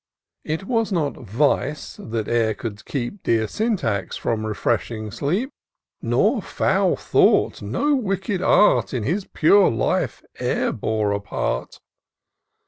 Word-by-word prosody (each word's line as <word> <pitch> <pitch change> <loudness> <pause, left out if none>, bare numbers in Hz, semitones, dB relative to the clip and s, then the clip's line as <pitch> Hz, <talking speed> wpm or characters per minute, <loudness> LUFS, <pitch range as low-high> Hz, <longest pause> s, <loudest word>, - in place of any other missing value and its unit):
It 160 +4 -3
was 225 +1 0
not 155 -6 0
Vice 135 +5 -1
that 110 -1 -4
e'er 115 -2 +1
could 110 -5 -7
keep 140 +8 -4
Dear 110 -1 +1
Syntax 170 - -1
from 110 -1 -2
refreshing 110 0 -2
sleep; 185 - -1 0.5
For - - -8
no - - +2
foul - - +1
thought, - - +2
no 295 +1 0
wicked 195 -5 -1
art. 205 -7 +4
In 120 - -1
his 185 - -1
pure 195 +5 +4
life 115 - -1 0.2
e'er - - 0
bore 110 -2 -1
a 100 - 0
part. 100 -10 -3
135 Hz, 135 wpm, -22 LUFS, -, 0.5 s, art